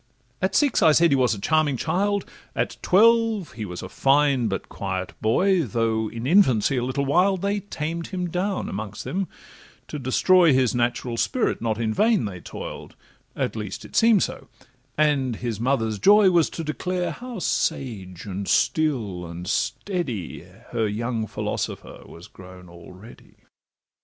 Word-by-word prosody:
At 190 +1 0
six, 285 -4 +3
I 155 - +6
said, 170 +2 +4
he - - +5
was 125 -4 +2
a - - -8
charming 155 +3 +1
child, 200 - 0 0.3
At - - -1
twelve 225 -2 +3
he 110 -3 -6
was 90 -2 -7
a - - -5
fine, 135 -3 +2
but 95 -2 -3
quiet 95 -2 -4
boy; 185 - +3
Although 110 -3 -1
in 115 +1 -6
infancy 135 - +4
a 120 - 0
little 130 +3 -1
wild, 180 +6 +2
They 200 +1 0
tamed 170 -4 -5
him 180 -2 -3
down 185 +3 -2
amongst 105 0 -6
them: 190 0 -2 0.6
to 150 - -5
destroy 165 +5 +4
His 130 -2 +2
natural 120 0 -1
spirit 255 - 0
not 110 -1 -1
in 110 -2 0
vain 215 - +2
they 95 -3 -6
toil'd, - - -8 0.4
At - - -2
least 105 -3 -6
it - - -13
seem'd 225 -4 +5
so; - - -5 0.5
and 140 -5 +2
his 115 -2 -4
mother's 115 -4 0
joy 200 - +6
Was 170 -3 +3
to 165 - -6
declare 180 +4 -2
how 245 -1 -8
sage, 100 - -2
and 100 -1 -5
still, 110 - 0
and 85 +1 -8
steady, 125 - -3 0.3
Her 115 -2 0
young 110 +1 -2
philosopher - - -4
was 85 +1 -12
grown 90 -1 -14
already. 90 +5 -14
130 Hz, 160 wpm, -24 LUFS, 110-180 Hz, 0.6 s, I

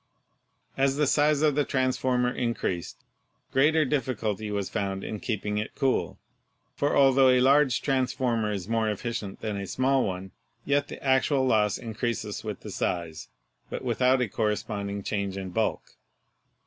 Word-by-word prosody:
As 135 0 +2
the 150 +1 +2
size 150 +1 +3
of 150 -2 +4
the 145 +1 +2
transformer 130 -2 +1
increased, 115 -8 -3 0.5
greater 150 +4 +4
diffi 130 -2 -1
culty 105 -1 -2
was 100 -2 -2
found 95 0 -3
in 105 - -5
keeping 105 -1 -2
it 105 - -5
cool, 135 -3 0 0.6
for 145 - +1
altho 135 -1 +6
a 125 0 +5
large 135 0 +4
transformer 125 -5 0
is 100 -3 -4
more 115 -1 +1
efficient 105 -1 -4
than 110 -2 -3
a 100 -1 -5
small 130 +3 +2
one, 95 0 -4 0.3
yet 145 0 +1
the - - -8
ac 130 -2 +4
tual 135 -3 +2
loss 105 -4 +2
increases 115 -1 -4
with - - -5
the - - -8
size, 85 -3 -3 0.4
but - - -5
without 125 +1 +2
a 125 - +1
correspond 105 -1 -2
ing 100 0 -4
change 100 -2 -2
in 95 -1 -5
bulk. - - 0
120 Hz, 160 wpm, -27 LUFS, 105-135 Hz, 0.6 s, altho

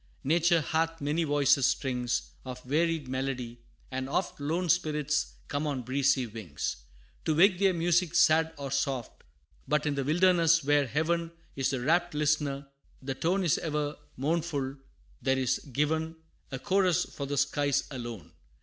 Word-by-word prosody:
Nature 170 +3 +3
hath 165 +3 -1
many 150 +4 0
voices 145 -3 +3
strings 125 -2 -1
Of 125 -1 -8
varied 160 +2 0
melody: 130 -2 -3 0.3
and 130 0 -3
oft 175 +3 -2
Lone 165 +5 -1
spirits 150 -3 0
come 145 +2 -2
on 135 -4 -2
breezy 135 +1 +2
wings, 105 -10 -5 0.5
To 155 - +1
wake 185 +2 +5
their 195 -2 +3
music 175 0 +1
sad 160 -1 +4
or 140 -2 -5
soft. 135 -3 -2 0.4
But 150 +2 +1
in 150 - +1
the 140 -1 -1
wilderness, 165 +1 +4
where 145 0 +3
Heaven 165 +5 0 0.2
Is 135 -1 0
the 130 -2 -2
wrapt 170 +4 +1
listener, 150 -2 0 0.3
the 135 0 -4
tone 180 +8 0
Is 170 - +2
ever 150 -2 -2 0.2
mournful: 145 -1 -1 0.4
there 130 +1 +1
is 130 -1 +1
given, 160 +4 0 0.4
A 135 - -3
chorus 185 +1 +2
for 140 - -6
the 145 +1 -3
skies, 140 0 +1
alone. 120 - -7
145 Hz, 150 wpm, -29 LUFS, 135-165 Hz, 0.5 s, wake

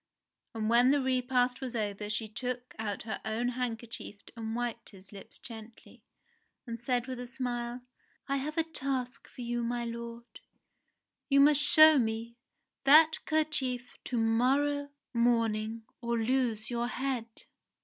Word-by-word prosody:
And 215 -1 -1
when 240 +3 +5
the 285 +1 +4
repast 255 -1 +1
was 255 -2 -4
over 210 -1 -2
she 220 +1 -1
took 250 +3 -5
out 210 -2 -3
her 220 - -5
own 225 +3 -1
handkerchief 235 -4 -5 0.2
and 225 -1 -4
wiped 240 -1 -3
his 195 -1 -14
lips 200 -2 -12
gently, 225 -1 -11 0.6
and 230 -2 -6
said 245 0 0
with 255 -1 -5
a 250 - -6
smile: 245 -1 -4 0.5
"I 275 - 0
have 300 +4 -4
a 325 - +4
task 265 -5 -4
for - - -11
you, 240 0 -2
my 240 0 -1
lord! 235 0 -7 0.9
You 280 0 +5
must 290 +1 +6
show 310 0 +7
me 230 0 -2 0.5
that 310 +3 +6
kerchief 300 -6 -1
to 245 - -2
morrow 270 +6 +2 0.2
morning 230 -2 +1 0.2
or 235 -1 -1
lose 230 -1 0
your 240 0 0
head." 255 -2 -2
240 Hz, 145 wpm, -31 LUFS, 230-260 Hz, 0.9 s, show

